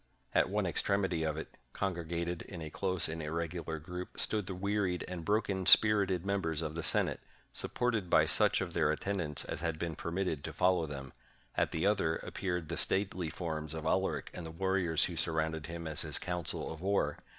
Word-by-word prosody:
At - - +3
one - - 0
extremity 95 -4 0
of 80 -1 -1
it, 80 - -8
con 100 -1 -1
gregated 85 0 -3
in 90 - -8
a 80 -2 -6
close 95 0 0
and 80 +1 -4
irregular 80 +1 -3
group, 90 +4 -7
stood 105 -3 +1
the 95 - -3
wearied 95 -1 0
and 90 -2 -5
broken 100 -2 0
spirited 100 -4 +6
members 80 -6 0
of 75 -1 -3
the 85 - -3
Senate, 80 - +1 0.3
supported 115 -7 -1
by - - +6
such - - +4
of - - -3
their 75 - +3
attendants 80 -3 -2
as - - -4
had 85 -2 -1
been 85 0 -3
permitted 85 -2 -2
to - - -5
follow 90 -3 +2
them; 70 -3 -7 0.4
at - - +2
the 80 - -1
other 95 -6 +2
appeared 90 -3 -3
the 85 - -3
stately 95 -4 0
forms 80 -2 -4
of 80 0 -5
Alaric 95 +4 0
and 90 - -6
the 80 - -6
warriors 90 -1 +1
who 90 - -2
surrounded 80 -1 0
him 85 0 -6
as 80 0 +6
his 75 -2 +2
council 90 -2 -2
of 80 - -11
war. 95 -6 +1
85 Hz, 195 wpm, -33 LUFS, 80-95 Hz, 0.4 s, spirited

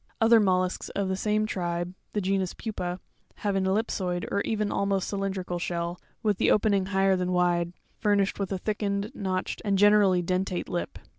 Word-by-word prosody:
Other 230 0 +6
mollusks 185 -3 +1
of 200 -1 -2
the 190 - 0
same 210 +2 +1
eae - - -6
tribe, 175 -1 -2 0.2
the 210 - 0
genus 190 -1 0
Pupa, 180 -5 -4 0.4
have 205 -2 -1
an 190 -1 +1
ellipsoid, 190 -3 -1
or 200 - +1
even 210 -1 -1
almost 200 -1 0
cylindrical 190 -3 -2
shell, 170 0 -3 0.2
with 210 -3 +1
the - - +3
opening 200 -3 +3
higher 195 -1 +3
than 180 0 -1
wide, 175 -1 +2 0.3
furnished 205 -2 +1
with 195 -1 -2
a 190 - 0
thickened, 205 +1 -2
notched, 185 -2 -3
and 200 -2 +1
generally 200 -3 +5
dentate 185 +1 -1
lip 175 - -3
(fig. - - -18
195 Hz, 180 wpm, -27 LUFS, 180-205 Hz, 0.4 s, Other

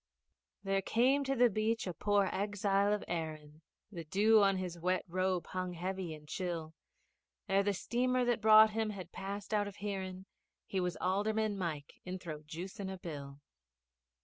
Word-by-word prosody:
There 195 0 +1
came 260 +8 +3
to 270 0 0
the 245 -1 +6
beach 220 +1 0
a 180 - -3
poor 200 +3 +2
exile 200 0 +1
of 210 - 0
Erin, 155 -2 -5 0.3
The 170 -4 -6
dew 210 +6 +4
on 195 -1 +4
his 180 -2 -4
wet 180 +2 0
robe 185 0 0
hung 185 -1 -3
heavy 180 -1 -4
and 150 0 -15
chill; 165 -2 -4 0.7
Ere 195 +1 +3
the 200 0 0
steamer 250 +5 +1
that 240 -2 +1
brought 220 0 +8
him 220 0 -1
had 195 -3 -7
passed 200 +2 -5
out 205 -1 +2
of 200 - -8
hearin', 190 -2 -4 0.4
He 190 - -2
was 180 -1 -1
Alderman 210 +3 +1
Mike 160 -7 -5
inthrojuicing' 180 +2 -6
a 190 - -6
bill! 145 -5 -8
190 Hz, 160 wpm, -34 LUFS, 175-210 Hz, 0.7 s, brought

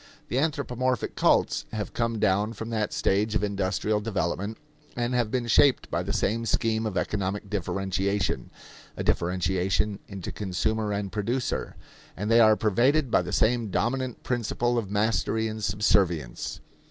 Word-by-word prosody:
The 125 - +1
anthropomorphic 130 -5 -1
cults - - +2
have 105 -2 -4
come 115 -1 -1
down 105 +1 +1
from 115 +1 -6
that 110 -2 -1
stage 105 +3 +1
of - - +1
industrial 100 +1 0
development 105 0 -2 0.4
and 120 +1 -1
have 120 -3 +1
been 125 +1 -1
shaped 130 +4 +4
by 85 - 0
the 95 +3 -3
same 110 +2 0
scheme 110 +1 +1
of 100 -4 -3
economic 100 0 -2
differentiation 95 +1 -1 0.5
a - - -2
differentiation 95 +3 0
into 95 -3 -6
consumer 105 +2 -1
and 100 -1 -2
producer 115 +5 -2 0.4
and 105 +4 -2
they 115 - +6
are 110 -2 +7
pervaded 125 +6 +2
by 95 - +4
the 90 0 -5
same 115 0 +2
dominant 125 +5 -1
principle 120 0 0
of 105 -4 -5
mastery 110 +2 +1
and 110 0 -5
subservience. 95 - 0
105 Hz, 150 wpm, -27 LUFS, 100-115 Hz, 0.5 s, are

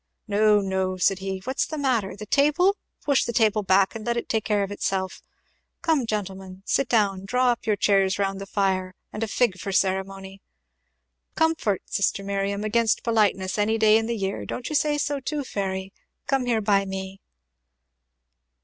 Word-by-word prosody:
"No, 210 0 +4
no," 190 -1 -1
said 190 +1 +2
he, 190 0 -4
"what's 260 +4 -1
the 310 - -5
matter? 240 -10 0
the 210 +1 -8
table? 300 - +3 0.3
Push 280 -2 +2
the - - -2
table 215 -2 +2
back, 190 0 +3
and 225 -2 -7
let 235 +2 -1
it 235 - -3
take 220 -2 0
care 205 -1 +1
of 195 - -5
itself, 190 -2 -2 0.6
come, 315 -8 +1
gentlemen, 190 -3 -5
sit 275 - +1
down 200 -4 +2
draw 250 +5 +2
up 235 - -5
your 215 - +3
chairs 195 -2 +2
round 195 -1 -1
the 195 - -7
fire, 185 -2 -1 0.2
and 210 - -5
a 225 - 0
fig 210 -3 +1
for 195 +2 -4
ceremony! 190 0 -1 0.9
Comfort, 320 - +1
sister 200 0 0
Miriam, 200 +1 -2
against 220 +1 +1
politeness, 210 -4 +1
any 220 +2 +2
day 215 -1 +5
in 225 0 +2
the 235 -1 -2
year; 195 -1 -3
don't 250 - -5
you 305 - -2
say 295 0 +2
so 290 -1 -1
too, 290 +2 -3
Fairy? 190 -4 -4 0.3
Come 270 -3 0
here 230 -2 +1
by 200 -1 +3
me." 190 0 -6
205 Hz, 180 wpm, -25 LUFS, 195-235 Hz, 0.9 s, day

